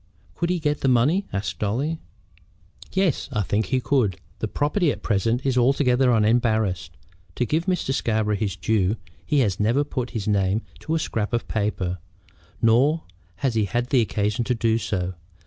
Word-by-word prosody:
"Could 170 - -2
he 180 - +1
get 150 -3 0
the - - +1
money?" 135 +11 +3
asked 95 -4 -3
Dolly. 135 +10 -1 0.9
"Yes, 190 -6 0
I 105 - 0
think 105 +2 0
he 130 - +1
could. 125 -8 +1 0.2
The - - -1
property 150 +3 +1
at - - -7
present 115 +4 0
is 130 -2 +2
altogether 125 0 +3
unembarrassed. 110 - +1 0.4
To 125 - 0
give 160 +7 -1
Mr. 180 -7 0
Scarborough 110 -4 0
his 100 -2 -2
due, 100 +1 +1 0.3
he 145 -3 +2
has 100 -6 0
never 115 +7 +2
put 125 -4 -3
his 105 - -4
name 100 +1 +1 0.2
to 160 - -2
a - - +1
scrap 110 -7 -2
of 120 - -1
paper; 100 -4 -1 0.6
nor 135 +8 +4 0.4
has 130 - +2
he 110 -2 +2
had 120 +6 -2
occasion 110 -2 +1
to 125 - +1
do 115 0 +1
so. 95 -4 -2
115 Hz, 170 wpm, -24 LUFS, 105-135 Hz, 0.9 s, nor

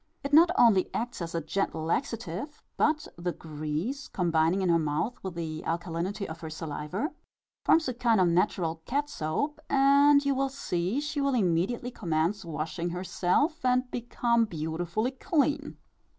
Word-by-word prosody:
It 280 +1 -4
not 330 +3 +8
only 205 -6 +5
acts 240 -3 -3
as 170 0 -4
a 165 - 0
gentle 160 0 -2
laxative, 230 - -3
but, 305 0 +1
the 175 +1 -1
grease, 160 - -4
combining 170 +1 +1
in 185 - +1
her 170 -1 +4
mouth 155 +10 -1
with 190 -3 -5
the 160 -2 -4
alkalinity 175 +4 -3
of 160 +1 -7
her 160 - -5
saliva, 160 - -4 0.5
forms 320 -2 +4
a 255 - -1
kind 235 -3 +2
of 185 - +4
natural 170 -2 +1
cat 290 +3 -1
soap, 285 - -2
and 280 +1 +5
you 280 - +3
will 270 0 0
see 200 -4 -2
she 295 -1 -2
will 275 -1 +1
immediately 205 +5 0
commence 175 -1 -1
washing 165 +1 -3
herself, 185 - 0
and 255 0 +2
become 235 -1 +1
beautifully 170 +6 -2
clean. 295 +1 0
195 Hz, 155 wpm, -28 LUFS, 165-270 Hz, 0.5 s, not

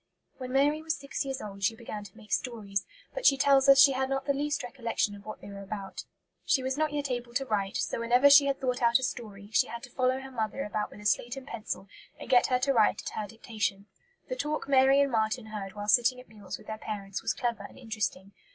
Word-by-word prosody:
When 255 -1 -6
Mary 290 +3 +3
was 320 0 -2
six 275 +1 -4
years 270 -1 -4
old 200 -1 -8
she 225 - +2
began 215 -2 -7
to 205 +2 -14
make 215 -2 -15
stories, 200 -5 -2 0.3
but - - -5
she 275 - +6
tells 275 0 +4
us 275 - +9
she 275 0 +8
had 265 0 -1
not 270 0 -1
the 280 - +2
least 290 0 -1
recollection 235 -4 -2
of 200 0 -12
what 215 - -7
they - - -10
were 200 0 -8
about. 195 0 -6 0.4
She 265 - +2
was 260 0 -1
not 310 0 0
yet 290 -2 -2
able 240 -1 -4
to 270 - +1
write, 200 -5 -1
so - - -2
whenever 245 +4 +5
she 285 0 +8
had 275 -1 0
thought 250 -2 -1
out 235 0 +5
a 260 - -5
story, 210 -5 -5
she - - +4
had 235 0 -7
to 245 - -10
follow 255 +1 +1
her 270 0 -9
mother 225 +2 -2
about 210 0 -3
with 210 - -13
a - - -13
slate 240 +5 +1
and 270 - -8
pencil 215 -6 -5 0.3
and - - -8
get 245 -1 +6
her 250 - +2
to 275 +2 +1
write 215 -4 +3
at - - -4
her 215 - -4
dictation. 210 -2 -3 0.4
The - - -3
talk 300 - -3
Mary 270 0 +5
and 280 -1 +1
Marten 220 +1 0
heard 210 -3 -6
while 205 0 -5
sitting 245 +3 +4
at 250 - -14
meals 205 -3 -8
with - - -17
their 220 0 -6
parents 200 -3 -5
was - - -1
clever 240 -1 -2
and - - -17
interesting. 210 -5 -3
240 Hz, 250 wpm, -29 LUFS, 210-270 Hz, 0.4 s, us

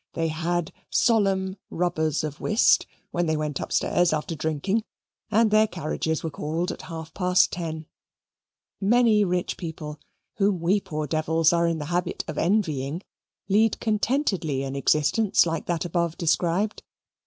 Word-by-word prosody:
They 165 -1 -1
had 170 +1 -2 0.2
solemn 195 -4 +2
rubbers 160 -4 0
of 155 0 -5
whist, 215 +3 +3 0.2
when 175 -1 0
they 155 0 +1
went 150 -3 -2
upstairs 175 -1 +1
after 155 +2 -2
drinking, 160 +8 -1 0.5
and 220 0 +3
their 215 +1 +5
carriages 160 -2 -3
were 160 - -3
called 160 +5 -2
at - - -8
half 160 -1 -8
past 180 -1 +3
ten. 160 -2 -4 0.9
Many 220 0 +4
rich 180 -2 -1
people, 155 -3 -6 0.4
whom 200 -3 +2
we 180 +5 +2
poor 155 -3 -4
devils 160 +2 +2
are 170 0 +3
in 165 -1 0
the 150 - -5
habit 175 0 -1
of 155 - -4
envying, 165 -4 0 0.4
lead 210 +2 +3
contentedly 210 - 0
an 135 0 -4
existence 155 - +3
like 165 -1 -3
that 175 0 -1
above 170 -1 -1
described. 175 +5 0
170 Hz, 145 wpm, -25 LUFS, 155-195 Hz, 0.9 s, their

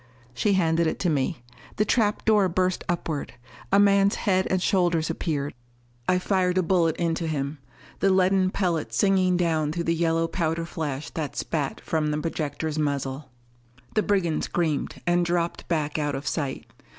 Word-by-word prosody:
She 200 - +1
handed 165 -3 +2
it - - -1
to 180 - +2
me. 140 -1 -1 0.3
The 210 - +2
trap 210 -1 +1
door 210 -4 +4
burst 185 +1 0
upward! 165 -4 -2 0.4
A 200 - +5
man's 200 0 +4
head 190 -2 +1
and 185 - +2
shoulders 175 -4 +1
appeared. 145 -4 -2 0.6
I 185 - +4
fired 180 -1 +1
a 185 - +3
bullet 165 -3 +2
into 165 -1 -1
him 145 -1 -3 0.4
the 195 - +3
leaden 185 0 +3
pellet 175 -5 -1
singing 185 -2 +3
down 160 -4 +1
through 170 +2 -2
the 165 - +1
yellow 165 0 +1
powder 165 -1 -1
flash 150 -4 -4
that 150 -5 -4
spat 145 -4 -2
from 155 -2 -1
the 150 - 0
projector's 155 0 -3
muzzle. 140 -1 -2 0.6
The 215 - +3
brigand 190 -6 +1
screamed, 160 -5 -1
and 175 0 +3
dropped 170 0 -1
back 155 -2 -1
out 145 -2 -1
of 135 +2 -5
sight. 140 -5 -2
165 Hz, 165 wpm, -25 LUFS, 155-185 Hz, 0.6 s, A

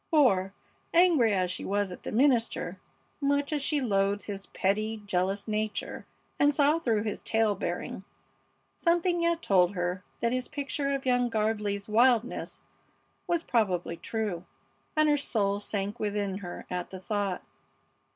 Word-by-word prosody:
For, 215 - +4 0.4
angry 330 -10 +5
as 185 -3 +1
she - - -3
was 200 -1 0
at 180 - -9
the - - -5
minister, 245 -1 +2 0.4
much 285 +1 +1
as 295 - 0
she 295 +2 +1
loathed 200 -4 +1
his 200 -2 -6
petty, 215 +3 -1
jealous 195 +1 -1
nature 215 0 -3 0.3
and 290 0 +4
saw 295 +2 +4
through 225 -9 +1
his 210 -2 -3
tale 220 -2 +2
bearing, 180 0 -4 0.7
something 345 0 +2
yet 335 0 +1
told 185 0 +3
her 180 +1 -2 0.2
that 235 0 +1
his 255 0 -2
picture 280 0 -2
of 270 - -5
young 245 -1 +2
Gardley's 210 -2 -1
wildness 235 +2 +2 0.7
was 340 -1 +1
probably 185 -8 0
true, 205 -3 -3 0.5
and 310 0 +4
her 295 -1 +4
soul 205 -7 0
sank 205 +1 -3
within 205 -2 -1
her 175 -3 -7
at 180 -1 -3
the 190 - -8
thought. 200 -1 -2
215 Hz, 150 wpm, -29 LUFS, 195-275 Hz, 0.7 s, angry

